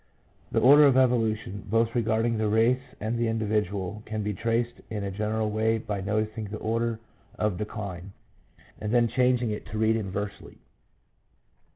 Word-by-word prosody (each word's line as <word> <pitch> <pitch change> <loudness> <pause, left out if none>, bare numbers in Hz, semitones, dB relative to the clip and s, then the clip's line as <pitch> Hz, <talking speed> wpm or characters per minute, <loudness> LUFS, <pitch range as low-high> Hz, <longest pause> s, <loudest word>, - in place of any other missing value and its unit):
The - - +2
order 145 +4 +8
of 130 -2 +4
evolution, 110 -6 +1
both 115 +2 +2
regarding 115 -1 +1
the 110 - +1
race 115 +4 +3 0.2
and 110 +2 -2
the 120 - +1
individual, 105 -3 -1
can 110 -1 -3
be 105 0 -2
traced 115 +4 -1
in 105 -2 -3
a 100 - -3
general 110 +2 -1
way 110 +1 +1
by 105 -2 -4
noting 110 +2 -2
the 105 +1 -6
order 115 +1 -1 0.4
of 105 -3 -1
decline, 100 -3 -6 0.7
and 105 0 -3
then 120 -1 +4
changing 125 -1 +2
it 105 - -5
to 105 - -5
read 110 +1 +3
inversely. 100 -1 -5
110 Hz, 160 wpm, -27 LUFS, 105-115 Hz, 0.7 s, order